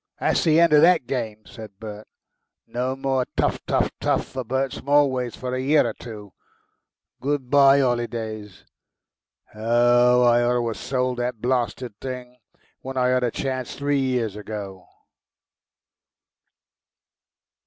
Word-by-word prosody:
"That's - - +1
the 160 0 +4
end 170 -2 +4
of 150 - +7
THAT 170 -4 +5
game!" 110 -4 -4
said 110 -4 -12
Bert. 105 -1 -9 0.6
"No 125 +2 -3
more 135 -1 -1
teuf - - 0
teuf - - +1
teuf - - 0
for 130 - -6
Bert 130 +3 -2
Smallways 135 -4 +1
for 125 0 -5
a 130 - -1
year 145 -1 +3
or 115 - -3
two. 105 -5 -10 0.9
Good 135 -2 -2
bye 140 -1 +6
'olidays!... 115 -5 -3 0.9
Oh! 120 +2 +3
I 120 0 +4
ought 120 +1 +2
to 120 -1 0
'ave - - -3
sold 125 -2 -2
the 120 +1 0
blasted 120 -2 -2
thing 125 -1 -7 0.4
when 135 0 -7
I 125 0 +2
had 125 0 +2
a 120 - +2
chance 130 0 -4
three 145 0 0
years 125 -6 -1
ago." 100 -3 -7
125 Hz, 140 wpm, -23 LUFS, 115-135 Hz, 0.9 s, of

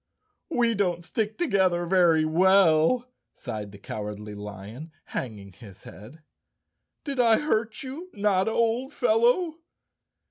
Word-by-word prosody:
"We 240 -7 +2
don't 180 -5 -1
stick 215 +5 -3
together 190 - +1
very 170 -3 +3
well," 185 +6 +4 0.3
sighed 105 -5 -7
the 100 - -12
Cowardly 105 +1 -7
Lion, 105 - -9
hanging 105 -6 -6
his 100 -4 -15
head. 125 - -13 0.8
"Did 280 -4 -4
I 230 -2 +5
hurt 225 -7 -1
you, 295 +8 -8
Notta, 200 -1 +1
old 235 +5 0
fellow?" 245 +9 +2
185 Hz, 115 wpm, -26 LUFS, -, 0.8 s, I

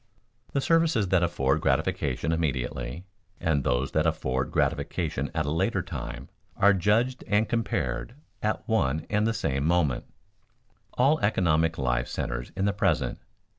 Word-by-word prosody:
_ - - -26
The 140 - +1
services 160 - +2
that 95 -2 +3
afford 75 -4 +1
gratification 70 +2 0
immediately, 70 -1 -2 0.3
and 75 -4 +1
those 65 +1 0
that 80 +1 +2
afford 65 -4 -1
gratification 75 -5 -1
at 80 -2 0
a 75 - -1
later 95 +4 0
time, - - -6 0.3
are 100 +1 +6
judged 110 +7 +1
and 105 +2 +2
compared 115 0 -2 0.3
at 110 +3 -2
one 80 - +1
and 105 +1 +2
the - - +2
same 70 -12 -1
moment. 80 -5 +1 0.9
All 140 +5 +3
economic 80 -5 +2
life 60 -2 0
centers - - -4
in 95 - +1
the 100 - +2
present. 100 -1 0
85 Hz, 145 wpm, -27 LUFS, 70-105 Hz, 0.9 s, are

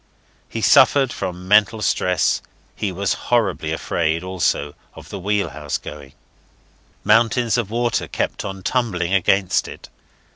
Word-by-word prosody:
He 115 - -5
suffered 135 +1 +5
from 90 0 -5
mental 105 +2 +4
stress. 90 -4 +1 0.3
He 100 - -2
was 95 +2 -1 0.2
horribly 95 -9 +1
afraid, 80 +1 -1
also, 90 -5 -1 0.2
of - - -12
the 100 - -6
wheelhouse 95 -7 -2
going. 70 -3 -10 0.9
Mountains 115 +2 +3
of 120 -5 -1
water 120 +1 -1
kept - - -3
on 95 -1 -6
tumbling 95 -9 -1
against 95 0 +2
it. - - -11
95 Hz, 130 wpm, -20 LUFS, 90-115 Hz, 0.9 s, suffered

